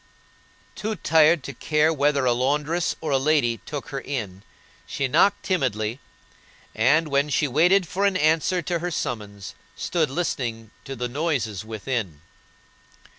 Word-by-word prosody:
Too 215 Hz, +1 st, -3 dB
tired 160 Hz, -3 st, +4 dB
to 140 Hz, -, -6 dB
care 150 Hz, +5 st, +1 dB
whether 140 Hz, -2 st, +1 dB
a 125 Hz, -, +3 dB
laundress 150 Hz, +7 st, 0 dB
or 155 Hz, -2 st, -3 dB
a 135 Hz, -, +3 dB
lady 135 Hz, -5 st, +2 dB
took 145 Hz, -3 st, -6 dB
her 135 Hz, -, -4 dB
in, 105 Hz, -10 st, -5 dB, 0.5 s
she 140 Hz, -, -1 dB
knocked 175 Hz, +9 st, +3 dB
timidly, 125 Hz, -, -1 dB, 0.7 s
and, 150 Hz, +8 st, +3 dB
while 140 Hz, +1 st, +1 dB
she 145 Hz, +1 st, +1 dB
waited 175 Hz, +7 st, +3 dB
for 195 Hz, +4 st, -1 dB
an 195 Hz, -2 st, +1 dB
answer 165 Hz, +3 st, +2 dB
to 170 Hz, +2 st, -1 dB
her 175 Hz, +2 st, -3 dB
summons, 105 Hz, -, -5 dB, 0.2 s
stood 160 Hz, -5 st, -1 dB
listening 120 Hz, -8 st, -3 dB
to 135 Hz, -, -6 dB
the 125 Hz, 0 st, -3 dB
noises 120 Hz, -, -2 dB
within. 110 Hz, -, -4 dB
140 Hz, 145 wpm, -24 LUFS, 120-160 Hz, 0.7 s, tired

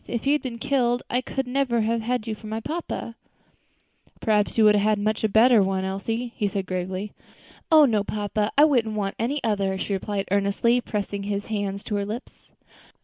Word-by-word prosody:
If 235 Hz, +1 st, -3 dB
you 275 Hz, -, +3 dB
had 295 Hz, -, +1 dB
been 245 Hz, -3 st, -5 dB
killed 245 Hz, -2 st, +1 dB
I 250 Hz, -, +1 dB
could 270 Hz, +1 st, -3 dB
never 250 Hz, -2 st, 0 dB
have 225 Hz, +1 st, 0 dB
had 240 Hz, 0 st, -1 dB
you 225 Hz, -, -3 dB
for 215 Hz, 0 st, -10 dB
my 220 Hz, +1 st, -3 dB
papa." 305 Hz, -3 st, -5 dB, 1.1 s
"Perhaps 210 Hz, -1 st, +1 dB
you 225 Hz, -, +5 dB
might 210 Hz, -1 st, +7 dB
have 205 Hz, -, +3 dB
had 215 Hz, 0 st, +3 dB
a -, -, -4 dB
much 215 Hz, +1 st, -1 dB
better 225 Hz, +1 st, +6 dB
one, 190 Hz, 0 st, 0 dB
Elsie," 225 Hz, +5 st, -3 dB
he 210 Hz, -, 0 dB
said 195 Hz, -1 st, -3 dB
gravely. 185 Hz, +2 st, -4 dB, 0.6 s
"Oh! 310 Hz, -2 st, +8 dB
no, 215 Hz, -6 st, +1 dB
papa, 210 Hz, +1 st, -2 dB
I 295 Hz, -, +8 dB
wouldn't 235 Hz, -8 st, +1 dB
want 200 Hz, -1 st, -2 dB
any 265 Hz, +6 st, -1 dB
other," 200 Hz, -4 st, 0 dB
she 200 Hz, -, -3 dB
replied 195 Hz, +1 st, -2 dB
earnestly, 200 Hz, +5 st, +2 dB
pressing 205 Hz, -3 st, -3 dB
his 200 Hz, 0 st, -3 dB
hand 200 Hz, -2 st, -3 dB
to 215 Hz, -, -4 dB
her 200 Hz, -, -1 dB
lips. 225 Hz, +5 st, -8 dB
215 Hz, 205 wpm, -24 LUFS, 200-240 Hz, 1.1 s, Oh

